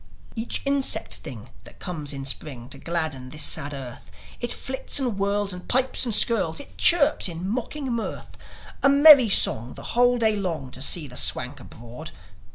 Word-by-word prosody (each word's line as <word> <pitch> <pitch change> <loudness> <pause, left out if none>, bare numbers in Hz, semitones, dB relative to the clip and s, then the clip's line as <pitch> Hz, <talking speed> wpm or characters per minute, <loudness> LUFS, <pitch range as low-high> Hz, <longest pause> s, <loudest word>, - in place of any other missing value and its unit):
Each 225 +1 -4
insect 275 -1 -1
thing - - -10
that - - -16
comes 155 -6 -6
in 135 -1 -7
Spring 130 -2 -6
To 135 - -8
gladden 155 -7 -4
this 150 +2 -2
sad 145 0 +1
earth, 130 -4 -9 0.3
It 240 0 -4
flits 265 0 -3
and 255 -5 -2
whirls 200 0 -1
and 180 0 -11
pipes 260 +1 +2
and 230 -4 -1
skirls, 205 -10 +1
It 285 - -10
chirps 300 - +4
in 170 +2 -6
mocking 255 +4 -4
mirth 230 -1 -6 0.5
A 275 - +4
merry 280 -4 +7
song 120 - +5
the - - -11
whole 245 +1 +3
day 220 -2 +1
long 165 -10 -5
To 130 - -8
see 150 +2 +1
the 125 -1 -8
Swank 130 +3 0
abroad. 120 0 -11
185 Hz, 175 wpm, -23 LUFS, -, 0.5 s, merry